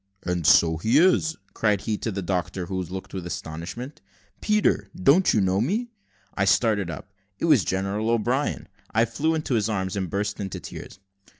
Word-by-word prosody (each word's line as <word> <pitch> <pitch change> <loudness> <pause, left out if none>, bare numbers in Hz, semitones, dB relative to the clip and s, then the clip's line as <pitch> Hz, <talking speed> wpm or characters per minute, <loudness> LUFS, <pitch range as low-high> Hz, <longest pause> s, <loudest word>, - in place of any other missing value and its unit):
"And 90 -3 -1
so 80 -1 +5
he 110 - +2
is," 165 -1 +3 0.2
cried 105 -3 +1
he, 110 - -1
to 115 - -2
the 100 -1 -4
doctor, 90 0 -2
who 95 +1 -3
looked 90 +2 -7
with 90 -3 -5
astonishment. 90 - -6 0.4
"Peter, 210 0 +1
don't 180 +1 +4
you - - +2
know 95 0 +2
me?" 220 - -1 0.4
I 95 - 0
started 100 -2 +2
up. 95 +5 -8 0.2
It - - -2
was 150 - +5
General 100 +4 -1
O'Brien. 120 +5 0 0.2
I 115 +1 +3
flew 155 +8 0
into 155 -4 -2
his 110 -2 +1
arms, 95 -3 -2
and 95 -3 -2
burst 100 +2 -2
into 95 -2 -4
tears. - - -9
105 Hz, 180 wpm, -25 LUFS, 95-125 Hz, 0.4 s, so